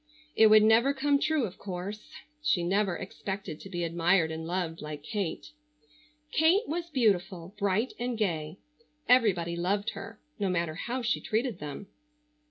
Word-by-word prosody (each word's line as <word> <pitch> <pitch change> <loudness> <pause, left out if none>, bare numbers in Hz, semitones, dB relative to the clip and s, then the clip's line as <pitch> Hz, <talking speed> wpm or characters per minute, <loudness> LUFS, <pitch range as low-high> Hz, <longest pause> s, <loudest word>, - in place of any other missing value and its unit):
It 220 - +7
would 215 0 +7
never 230 +6 +4
come 280 +1 +2
true, 310 -1 +1
of 190 - -8
course. 195 +2 -6 0.3
She 265 - +2
never 190 0 +1
expected 195 -3 -6
to 195 - -10
be 175 -2 -3
admired 170 0 +2
and 160 0 -5
loved 175 -2 -3
like 150 -1 -7
Kate. 195 -5 -4 0.8
Kate 340 +10 +3
was 340 +2 -3
beautiful, 195 - 0
bright 205 +5 +1
and 245 -1 -2
gay. 165 -5 -2 0.5
Everybody 190 -9 +3
loved 200 +4 0
her, 215 +1 -9 0.2
no 200 -2 0
matter 170 -3 0
how 240 +9 -4
she 240 - 0
treated 225 -2 -1
them. 150 +6 -6
200 Hz, 155 wpm, -29 LUFS, 170-235 Hz, 0.8 s, It